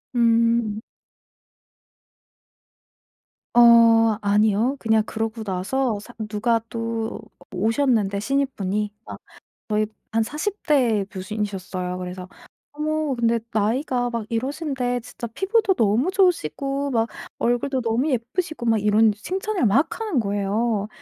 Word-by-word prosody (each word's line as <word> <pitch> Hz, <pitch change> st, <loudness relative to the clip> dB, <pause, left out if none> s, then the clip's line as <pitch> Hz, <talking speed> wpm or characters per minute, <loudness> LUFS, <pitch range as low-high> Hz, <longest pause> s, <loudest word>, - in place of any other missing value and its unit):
음. 230 Hz, -2 st, +2 dB, 2.7 s
어 230 Hz, -2 st, +6 dB
아니요. 210 Hz, +5 st, +2 dB
그냥 220 Hz, -1 st, +2 dB
그러고 225 Hz, 0 st, -4 dB
나서 205 Hz, +5 st, -1 dB
사 240 Hz, +4 st, -13 dB, 0.2 s
누가 230 Hz, +2 st, +1 dB
또 230 Hz, 0 st, -3 dB, 0.2 s
어 180 Hz, -, -18 dB
오셨는데, 220 Hz, -1 st, +1 dB
신입분이. 210 Hz, -5 st, -1 dB
아 -, -, -8 dB, 0.5 s
저희 215 Hz, 0 st, +1 dB, 0.3 s
한 225 Hz, +1 st, +2 dB
40 325 Hz, -, -4 dB
대 235 Hz, -9 st, +2 dB
교수님이셨어요. 190 Hz, -2 st, -4 dB
그래서 180 Hz, 0 st, -6 dB, 0.4 s
어머 305 Hz, -1 st, -1 dB
근데 235 Hz, -1 st, +1 dB
"나이가 245 Hz, +3 st, 0 dB
막 230 Hz, -2 st, -3 dB
이러신데 255 Hz, 0 st, -2 dB
진짜 235 Hz, 0 st, -7 dB
피부도 385 Hz, -, +1 dB
너무 230 Hz, -, +2 dB
좋으시고, 280 Hz, -, 0 dB
막 230 Hz, -2 st, +1 dB, 0.3 s
얼굴도 255 Hz, +3 st, 0 dB
너무 235 Hz, +5 st, 0 dB
예쁘시고." 255 Hz, +4 st, -2 dB
막 225 Hz, -2 st, +3 dB
이런 210 Hz, +1 st, +4 dB
칭찬을 375 Hz, -, -2 dB
막 245 Hz, -, +2 dB
하는 425 Hz, -, 0 dB
거예요. 205 Hz, +1 st, -1 dB
230 Hz, 245 characters per minute, -23 LUFS, 210-265 Hz, 2.7 s, 어